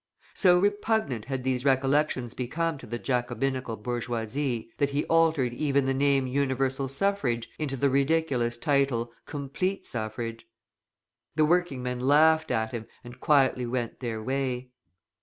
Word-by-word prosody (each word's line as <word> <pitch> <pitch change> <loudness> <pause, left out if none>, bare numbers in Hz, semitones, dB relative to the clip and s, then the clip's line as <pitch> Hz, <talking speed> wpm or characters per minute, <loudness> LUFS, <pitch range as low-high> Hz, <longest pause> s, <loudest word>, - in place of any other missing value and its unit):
So 180 -3 +5
repugnant 205 - 0
had 135 -2 -3
these 130 -1 0
recollections 135 -2 +1
become 155 +5 -2
to - - -11
the 120 +2 -3
Jacobinical 125 0 -1
bourgeoisie, 120 +1 -3
that 140 - +2
he 140 +1 -1
altered 160 -7 +2
even 140 0 +1
the 135 - +1
name 135 0 +2
Universal 135 0 0
Suffrage 135 -6 -1
into 140 -3 -2
the 140 - +2
ridiculous 135 -4 +1
title, 135 -3 +1 0.2
Complete 150 +7 -3
Suffrage. 115 0 -5 0.9
The 155 - +4
working 165 -6 +1
men 125 0 -3
laughed 160 +4 +4
at 110 0 0
him 115 -3 -5 0.2
and 120 0 -11
quietly 130 -4 +3
went 120 -1 -3
their 115 -3 -4
way. 130 0 -2
135 Hz, 140 wpm, -27 LUFS, 120-145 Hz, 0.9 s, So